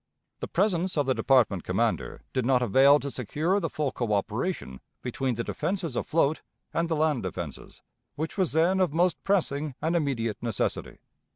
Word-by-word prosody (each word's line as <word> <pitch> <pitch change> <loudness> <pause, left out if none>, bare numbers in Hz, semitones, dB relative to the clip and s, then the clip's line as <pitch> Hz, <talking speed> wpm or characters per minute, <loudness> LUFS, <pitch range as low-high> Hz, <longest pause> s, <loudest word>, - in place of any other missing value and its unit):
The - - -4
presence 185 -2 0
of 145 - +2
the 130 - +2
department 120 -10 +3
commander - - -1
did 130 - 0
not 125 0 +3
avail 135 +6 +6
to 140 - -4
secure 155 - 0
the 165 -4 -2
full 150 -3 -2
coöperation 110 - -2 0.2
between 130 0 -1
the 115 - -2
defenses 175 -4 -3
afloat 155 +3 +1 0.3
and 170 0 0
the 165 - +1
land 150 -4 +1
defenses, 85 -7 -7 0.3
which 160 +2 -4
was 185 -7 +1
then 170 +4 +3
of 180 -6 +2
most 175 +1 +1
pressing 155 -8 0
and 165 +2 0
immediate 115 -9 -1
necessity. 115 -4 -2
140 Hz, 165 wpm, -27 LUFS, 120-170 Hz, 0.3 s, avail